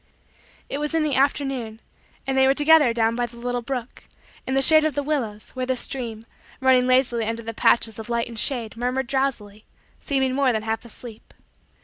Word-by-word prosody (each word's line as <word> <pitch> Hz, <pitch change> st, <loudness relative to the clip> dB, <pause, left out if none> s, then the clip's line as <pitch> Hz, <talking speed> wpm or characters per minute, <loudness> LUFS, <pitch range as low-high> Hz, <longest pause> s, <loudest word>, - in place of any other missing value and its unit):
It 280 Hz, -, -4 dB
was 300 Hz, +2 st, -2 dB
in 320 Hz, -, +2 dB
the 300 Hz, -2 st, -1 dB
afternoon 265 Hz, -5 st, -1 dB, 0.5 s
and 270 Hz, -, -2 dB
they 265 Hz, 0 st, +4 dB
were 270 Hz, -, +3 dB
together 295 Hz, -3 st, +5 dB
down 230 Hz, 0 st, +1 dB
by 240 Hz, 0 st, -1 dB
the 235 Hz, 0 st, -15 dB
little 245 Hz, +1 st, -3 dB
brook, 245 Hz, 0 st, -6 dB, 0.4 s
in 260 Hz, -, -1 dB
the 270 Hz, -, +3 dB
shade 310 Hz, +2 st, +7 dB
of 310 Hz, -1 st, -1 dB
the 285 Hz, -, -1 dB
willows, 240 Hz, -8 st, -3 dB
where 255 Hz, -1 st, -4 dB
the 260 Hz, -, 0 dB
stream, 235 Hz, -3 st, -4 dB, 0.4 s
running 260 Hz, -1 st, +3 dB
lazily 255 Hz, -3 st, +2 dB
under 230 Hz, +1 st, -3 dB
the 230 Hz, +1 st, -6 dB
patches 225 Hz, 0 st, +2 dB
of 220 Hz, -, -8 dB
light 235 Hz, 0 st, -1 dB
and 230 Hz, -2 st, -6 dB
shade, 235 Hz, -4 st, -1 dB
murmured 250 Hz, +3 st, -2 dB
drowsily 240 Hz, -6 st, -2 dB, 0.4 s
seeming 265 Hz, -2 st, -1 dB
more 270 Hz, -1 st, +2 dB
than 220 Hz, -2 st, -2 dB
half 225 Hz, +1 st, -3 dB
asleep. 230 Hz, -1 st, -12 dB
250 Hz, 200 wpm, -23 LUFS, 230-270 Hz, 0.5 s, shade